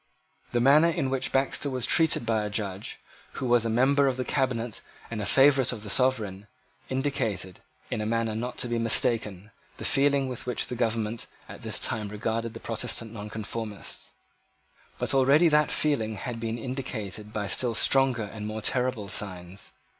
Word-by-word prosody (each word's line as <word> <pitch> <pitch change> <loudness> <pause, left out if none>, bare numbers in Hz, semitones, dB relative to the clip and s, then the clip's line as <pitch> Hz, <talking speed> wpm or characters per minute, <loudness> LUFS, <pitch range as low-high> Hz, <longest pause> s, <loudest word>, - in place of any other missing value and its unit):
The 120 - +1
manner 145 +7 +6
in 135 -5 -1
which 135 -1 -1
Baxter 135 +1 +1
was 130 -3 -1
treated 160 -6 +3
by 110 -2 +1
a 105 - -3
judge, 100 -2 -4 0.3
who - - -4
was 120 -2 +3
a - - 0
member 135 +5 +4
of 130 -1 0
the 130 - -2
cabinet 125 -4 -1 0.3
and 110 -2 -3
a 100 - -2
favourite 135 -2 +5
of 110 -4 -6
the 105 - -3
Sovereign, 105 -7 +1 0.4
indicated, 120 -9 -2 0.3
in 105 - -1
a - - -2
manner 115 -1 0
not 120 +3 -4
to - - -1
be 120 -1 -1
mistaken, 110 -3 +1 0.3
the - - -5
feeling 140 -1 +3
with 125 -1 -6
which 125 - -1
the 125 - -5
government 115 -1 -1 0.2
at - - -10
this - - 0
time 110 -2 -1
regarded 115 +2 -3
the - - -6
Protestant 115 0 -2
Nonconformists. 105 0 -5 0.8
But - - -1
already 140 +5 +5
that 150 0 +3
feeling 115 -8 0
had 115 +3 -5
been 115 0 -3
indicated 110 -5 -5
by 105 -1 -2
still 120 +2 +1
stronger 130 -2 +3
and 105 0 -6
more 110 0 -5
terrible 125 -3 0
signs. 95 -1 -3
115 Hz, 175 wpm, -27 LUFS, 105-130 Hz, 0.8 s, manner